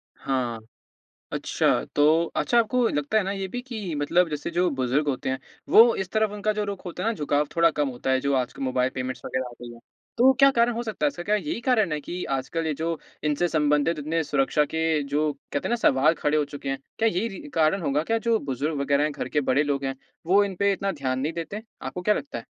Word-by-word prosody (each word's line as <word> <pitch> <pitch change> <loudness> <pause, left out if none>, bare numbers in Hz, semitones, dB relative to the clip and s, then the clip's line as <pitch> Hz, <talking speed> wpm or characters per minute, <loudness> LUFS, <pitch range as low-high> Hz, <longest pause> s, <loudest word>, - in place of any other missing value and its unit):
हाँ। 125 -4 -2 0.7
अच्छा, - - +1
तो 155 +3 +4
अच्छा 240 - +1
आपको 235 +1 +2
लगता 145 +8 0
है 215 - +3
ना, 195 - -2
ये 195 -1 -3
भी 245 +6 -5
कि 220 -9 -5
मतलब 165 +4 +2
जैसे 150 +1 -4
जो 175 +1 +2
बुज़ुर्ग 135 +3 0
होते 135 -2 -1
हैं, 130 0 -2 0.3
वो 230 +1 +7
इस 190 -2 -3
तरफ़ 215 -1 +1
उनका 210 +1 -1
जो 210 0 -1
रुख 200 -2 -6
होता 180 0 -5
है 225 - +2
ना, - - 0
झुकाव 145 -4 0
थोड़ा 165 0 +5
कम 145 -2 0
होता 125 +1 -4
है, 130 - +3
जो 140 +1 0
आजकल 130 +1 -2
मोबाइल 130 -1 +1
पेमेंट्स 130 -1 -4
वगैरह 130 - -2
आ - - -11
गई 120 - -8
हैं। 115 - -14 0.4
तो 255 +3 +6
क्या 275 0 +8
कारण 235 -1 +3
हो 235 +1 -3
सकता 220 +5 -2
है? - - +5
इसका 280 -12 -4
क्या 210 +3 +2
यही 270 +3 -3
कारण 220 -8 +2
है 150 - -1
कि 175 +5 -5
आजकल 160 +5 -3
ये 155 - 0
जो 165 0 -1 0.3
इनसे 150 +3 +1
संबंधित 150 0 +1
इतने 160 +3 -1
सुरक्षा 145 +1 +1
के 160 0 0
जो 150 +2 0
कहते 140 0 -5
हैं - - -4
ना, 240 - +2
सवाल 155 - +3
खड़े 150 +1 +1
हो 150 - +2
चुके 145 -1 -7
हैं। 135 0 -2 0.2
क्या 225 - +4
यही 210 +3 -1
रि 230 +8 -9
कारण 160 +4 +2
होगा 145 0 0
क्या, 225 +7 0
जो 230 0 +1
बुज़ुर्ग 140 +2 -2
वगैरह 140 +1 +2
हैं, 150 - 0
घर - - -5
के 150 - +1
बड़े 140 +3 +3
लोग 140 -2 -1
हैं, 135 0 -2 0.3
वो 195 +4 +5
इन 195 -2 -4
पे 200 +2 +2
इतना 195 0 -2
ध्यान 130 -6 -2
नहीं 150 +5 -2
देते? 170 +6 -5 0.2
आपको 180 - -5
क्या 210 +3 +3
लगता 285 0 -5
है? - - -8
160 Hz, 250 wpm, -25 LUFS, 140-205 Hz, 0.7 s, क्या